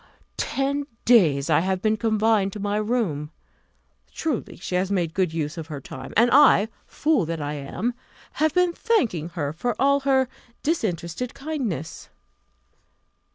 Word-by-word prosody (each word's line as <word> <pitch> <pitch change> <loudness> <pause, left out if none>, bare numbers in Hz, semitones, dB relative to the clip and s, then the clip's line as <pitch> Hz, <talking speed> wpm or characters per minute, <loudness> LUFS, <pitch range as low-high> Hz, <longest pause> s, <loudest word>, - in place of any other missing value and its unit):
Ten 280 +1 -1 0.2
days 160 - +5
I 155 -3 +4
have 190 +2 0
been 215 +2 +2
confined 215 -2 +2
to 210 - -6
my 205 +1 -1
room. 210 -10 -1 0.8
Truly, 310 -8 -3
she 185 - -7
has 185 +1 +1
made 175 -5 0
a - - -32
good 185 -3 +1
use 160 +1 -3
of 160 - -7
her 150 -3 -6
time: 130 0 -9
and 235 +2 +5
I, 255 -6 +6 0.2
fool 300 - +1
that 165 0 -3
I 145 0 -3
am, 150 - -3 0.5
have 310 0 +4
been 360 -1 +3
thanking 235 - 0
her 145 -2 -1
for 235 +8 -2
all 280 +2 +4
her 265 -1 +2 0.4
disinterested 220 - -2
kindness! 260 - -4
210 Hz, 155 wpm, -24 LUFS, 165-265 Hz, 0.8 s, I